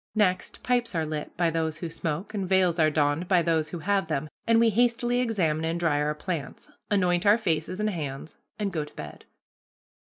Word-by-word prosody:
Next, 190 -4 0
pipes 245 -5 0
are 160 -1 +1
lit 155 -1 -5
by 170 -1 +2
those 160 -1 -1
who 170 - -4
smoke, 165 +4 -4
and 195 -4 -3
veils 185 -3 +3
are 155 -1 +5
donned 150 +3 +1
by 180 -3 +4
those 160 -2 +1
who 175 - -5
have 195 +1 0
them, 155 -1 -2 0.2
and 230 0 +5
we 230 -1 +4
hastily 240 +2 +2
examine 180 -11 0
and 165 +1 -1
dry 155 -4 +1
our 150 0 0
plants, 155 -4 -5 0.2
anoint 180 -4 +2
our 205 +2 +6
faces 175 -2 -1
and 215 0 +1
hands, 150 -3 -5 0.2
and 205 -2 -2
go 155 -3 -1
to 150 - -13
bed. 75 -1 -9
170 Hz, 200 wpm, -27 LUFS, 155-200 Hz, 0.2 s, our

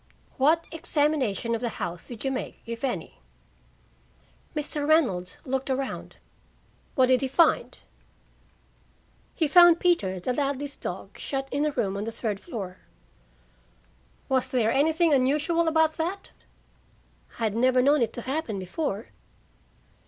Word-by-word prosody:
"What 315 +5 +3
examination 290 - 0
of 230 - -2
the 240 - -1
house 170 0 -5
did 240 +1 -8
you 270 - +1
make 260 - -5
if 230 +1 -6
any?" 260 -3 -3 1.4
"Mr. 295 -1 -2
Reynolds 200 - +2
looked 265 0 -2
around." 265 0 -3 0.8
"What 260 - +5
did 255 0 +3
he 270 - 0
find?" 310 +5 +2 1.6
"He 320 - +1
found 345 +2 +7
Peter, 200 - +1
the 250 +8 -2
Ladleys' 280 +1 -2
dog, - - -7
shut 270 -1 -3
in 285 +2 0
a - - 0
room 200 -8 -1
on 205 - -3
the 230 - -3
third 220 -3 -3
floor." 195 - -7 1.5
"Was 260 -1 +1
there 230 -3 +1
anything 315 +4 +3
unusual 300 +6 +2
about 320 0 +3
that?" 360 +5 -3 1.1
"I 230 - -4
had 215 -2 +1
never 255 +2 +3
known 285 +1 +4
it 230 - +1
to 240 - -6
happen 265 -6 -2
before." 200 - -3
270 Hz, 135 wpm, -26 LUFS, 230-310 Hz, 1.6 s, found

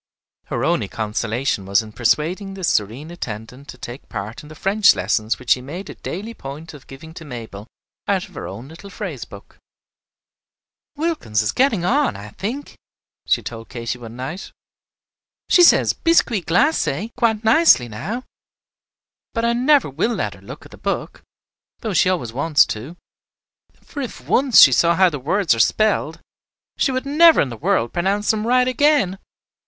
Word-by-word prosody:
Her - - -3
only - - +1
consolation 110 0 -2
was 100 +3 +2
in 110 - -11
persuading 170 - -1
this 190 -3 -1
serene 120 +10 -2
attendant 125 -3 -8
to 130 - -10
take 120 +2 -8
a - - -34
part 105 +3 -6
in 150 - -14
the 155 - -11
French 205 +5 +4
lessons 110 +1 -1
which 125 -2 -4
she 125 - +4
made 170 +9 -7
a - - -8
daily 210 +7 -6
point 155 -2 -9
of 145 -3 -14
giving 160 +4 -12
to 165 - -10
Mabel 115 -6 -9 0.4
out 195 0 0
of 185 - -20
her - - -6
own 115 +7 -8
little 165 +6 -12
phrase - - -6
book. - - -15 1.4
"Wilkins 295 - -1
is 105 - 0
getting 235 -9 +1
on, 280 +7 +1
I 105 +1 -9
think," 230 - -6 0.5
she - - +2
told 115 -1 -8
Katy 120 0 -5
one 115 -1 -10
night. 135 +9 -6 1.0
"She 360 - +6
says 345 - +5
'Biscuit 240 - +1
glacé' 225 - +1
quite 225 -3 +1
nicely 225 - +5
now. 205 - -5 1.1
But 230 0 0
I 235 - +2
never 265 +4 +3
will 165 - -1
let - - -2
her - - -16
look - - -11
at - - -15
the - - -13
book, - - -4 0.6
though 220 -4 -3
she 180 - +3
always 145 -12 -2
wants 145 +3 +3
to; 130 +11 -9 0.9
for 285 - -7
if 255 - -6
once 260 -2 +5
she 135 - +9
saw 170 +7 +3
how 185 0 +4
the 145 - -5
words 165 +5 +1
are 115 - -3
spelled, 195 - +1 0.5
she 275 - +1
would 260 +1 -2
never 320 +4 +6
in 135 - +2
the 120 - -7
world 115 +1 0
pronounce 195 +4 +1
them 220 0 -2
right 250 +1 +3
again. 255 -7 +2
170 Hz, 175 wpm, -20 LUFS, -, 1.4 s, she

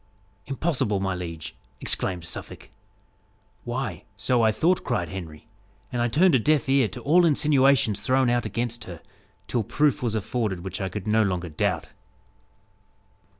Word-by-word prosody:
"Impossible, 135 - 0
my 95 -1 -1
liege?" 85 -3 -6 0.2
exclaimed 90 -3 +1
Suffolk. - - -8 0.9
"Why, 120 - -4
so 120 +3 +2
I 110 -1 +4
thought," 170 +12 +1
cried 85 -5 -1
Henry, 85 -2 -8 0.4
"and 120 -2 -1
I 120 - +2
turned 165 +8 +4
a 130 - +5
deaf 145 +2 +2
ear 135 -3 +3
to 95 - -9
all 170 +5 +4
insinuations 140 - +3
thrown 130 +4 +2
out 120 0 +1
against 120 0 -3
her, 85 -4 -8 0.5
till 120 - 0
proof 145 +6 +1
was 115 -3 -1
afforded 110 -3 -2
which 95 +1 -5
I 95 - -2
could 105 0 -6
no 110 +1 +3
longer 90 -4 -1
doubt." 75 - -1
115 Hz, 150 wpm, -25 LUFS, 95-135 Hz, 0.9 s, a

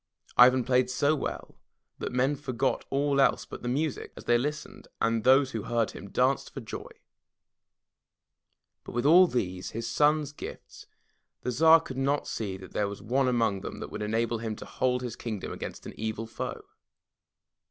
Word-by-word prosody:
Ivan 125 +1 +7
played 125 0 +2
so 145 +4 +2
well 140 - -5 0.4
that - - -3
men 130 +3 +1
forgot 135 -2 -1
all 140 0 +2
else - - +3
but - - -9
the - - -5
music 145 +3 -2
as - - -9
they 120 - +3
listened, 150 +4 -5
and 115 -1 +1
those 130 +1 +5
who 110 - -3
heard 115 0 0
him 100 - -10
danced 130 +5 +1
for - - -6
joy. 115 -5 -7 1.9
But - - -9
with 120 +2 -1
all 180 +5 +8
these, 95 - -2
his 115 0 -4
son*s 150 +4 +2
gifts, 145 - -10 0.6
the 125 - -1
Tsar 160 +5 +6
could 130 -4 -6
not 140 +2 +1
see 100 -4 -3
that 95 -1 -12
there 105 - 0
was 100 0 -7
one 130 +5 +1
among 115 -6 +1
them - - -7
that - - -7
would - - -5
enable 115 +2 0
him 110 -1 -3
to - - -9
hold 125 -1 0
his 120 -2 -4
kingdom 110 -5 -5
against - - -7
an - - -7
evil 110 0 -3
foe. 115 0 -6
125 Hz, 180 wpm, -28 LUFS, 115-140 Hz, 1.9 s, all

